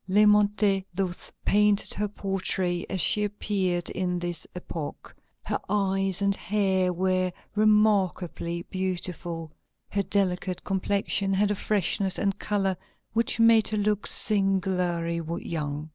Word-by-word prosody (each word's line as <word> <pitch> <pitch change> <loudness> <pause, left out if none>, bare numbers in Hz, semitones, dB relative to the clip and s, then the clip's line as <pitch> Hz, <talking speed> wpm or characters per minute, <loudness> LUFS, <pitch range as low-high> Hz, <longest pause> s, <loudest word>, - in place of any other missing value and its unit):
Lémontey 210 -1 +4
thus 185 -2 -3
paints 210 0 +3
her 210 +1 -1
portrait 190 -3 -2
as 190 - -2
she 210 +3 +3
appeared 195 -4 -1
at 180 -1 -1
this 175 -1 -4
epoch: 165 -4 -7 0.3
"Her - - -2
eyes 195 -1 +1
and 200 0 +2
hair 190 -3 +1
were 185 0 0 0.2
remarkably 200 -5 +2
beautiful; 175 -3 -3 0.4
her 200 - 0
delicate 185 -2 -1
complexion 195 0 0
had 205 +1 +2
a - - 0
freshness 195 -1 0
and 200 -1 -1
color 195 -2 0 0.4
which 230 0 +1
made 230 -1 +6
her 215 - -1
look 210 0 +1
singularly 180 -4 0 0.3
young. 150 -2 -3
195 Hz, 120 wpm, -26 LUFS, 180-205 Hz, 0.4 s, made